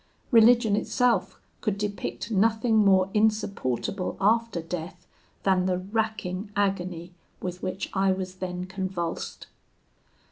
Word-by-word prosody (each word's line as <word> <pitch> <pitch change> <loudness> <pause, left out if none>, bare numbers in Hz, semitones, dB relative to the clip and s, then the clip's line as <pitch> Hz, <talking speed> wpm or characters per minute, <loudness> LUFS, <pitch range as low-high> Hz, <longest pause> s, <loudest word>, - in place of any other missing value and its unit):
Religion 230 -2 +6
itself 245 +3 +1 0.2
could 210 -3 -1
depict 205 +1 -4
nothing 220 +2 +2
more 195 -2 +4
insupportable 200 - 0
after 225 -1 +2
death 175 +2 -6 0.4
than 185 -1 +2
the 180 -1 +1
racking 200 -1 -2
agony 180 -4 -1 0.3
with 180 0 -5
which 185 +1 -3
I 195 0 +3
was 185 -1 -3
then 180 -1 -4
convulsed. 185 -3 -4
195 Hz, 110 wpm, -26 LUFS, 180-215 Hz, 0.4 s, Religion